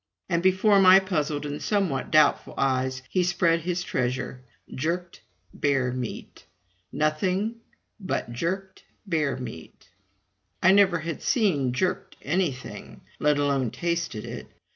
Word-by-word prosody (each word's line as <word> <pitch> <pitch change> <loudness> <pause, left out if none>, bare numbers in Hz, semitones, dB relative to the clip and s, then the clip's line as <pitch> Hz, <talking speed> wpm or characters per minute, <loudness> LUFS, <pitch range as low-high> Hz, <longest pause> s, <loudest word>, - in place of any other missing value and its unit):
And 170 -2 +1
before 190 +3 +4
my 190 0 +8
puzzled 150 -6 -2
and 145 0 -5
somewhat 190 -11 0
doubtful 155 -1 +3
eyes 130 -1 0
he 185 - +1
spread 175 -2 +2
his 175 +1 -2
treasure 125 -1 -2 0.3
jerked 170 +5 -3 0.3
bear 135 -3 +1
meat, 125 -2 -6 0.5
nothing 185 +9 0 0.4
but 185 - -3
jerked 190 +8 -3 0.2
bear 155 -8 0
meat. 115 -9 -10 0.7
I 185 - +5
never 195 -3 +5
had 165 0 -5
seen 180 - +1
jerked 180 +9 -2
anything, 150 -5 -3 0.2
let 150 -1 +3
alone 140 -4 +1
tasted 170 -3 -3
it. - - -7
165 Hz, 120 wpm, -26 LUFS, 135-185 Hz, 0.7 s, my